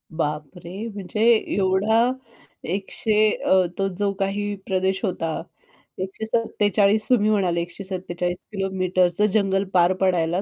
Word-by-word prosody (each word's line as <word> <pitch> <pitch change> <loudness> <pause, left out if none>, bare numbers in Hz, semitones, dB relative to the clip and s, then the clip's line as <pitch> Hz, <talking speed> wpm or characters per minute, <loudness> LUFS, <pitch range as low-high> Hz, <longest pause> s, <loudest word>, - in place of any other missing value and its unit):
बाप 150 -2 -2
रे! 190 +6 -7
म्हणजे 200 +1 -4 0.3
एवढा 210 +5 +2 0.6
एकशे 215 +1 +1 0.2
अ, 190 0 +5 0.2
तो 195 0 +1
जो 205 -1 +1
काही 205 +1 -1
प्रदेश 190 0 0
होता 165 -4 -2 0.6
147 210 0 +1
तुम्ही 215 -4 +3
म्हणाले 180 -5 +1
147 180 -1 -5
किलोमीटरचं 185 -1 +1
जंगल 195 -2 +2
पार 180 +1 +4
पडायला 175 -1 +1
195 Hz, 110 wpm, -23 LUFS, 180-205 Hz, 0.6 s, अ